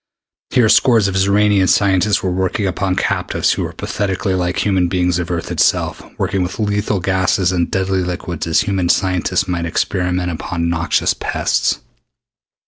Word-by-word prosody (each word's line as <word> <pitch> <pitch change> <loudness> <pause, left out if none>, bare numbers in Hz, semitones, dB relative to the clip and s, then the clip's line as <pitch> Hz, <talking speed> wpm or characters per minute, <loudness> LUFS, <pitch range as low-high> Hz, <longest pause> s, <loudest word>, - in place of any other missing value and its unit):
Here 120 -3 +3
scores 115 -2 +4
of 100 - -2
Xoranian 100 0 +3
scientists 100 0 +2
were 95 - 0
working 95 +3 -1
upon 95 0 -1
captives - - 0
who - - -1
were - - -3
pathetically 95 -1 -2
like 90 -1 -1
human 95 -3 +2
beings 90 -1 0
of 85 - -4
Earth 85 -2 -3
itself, - - +1 0.2
working 95 - -1
with 90 +1 -3
lethal 105 -1 -1
gases 95 0 +1
and 85 -2 0
deadly 95 0 0
liquids 90 -2 -4
as 80 - +3
human 95 -3 -1
scientists 95 0 +1
might 85 -2 -2
experiment 90 +1 -1
upon 85 +1 -3
noxious 85 0 +1
pests. - - -1
95 Hz, 155 wpm, -17 LUFS, 90-100 Hz, 0.2 s, scores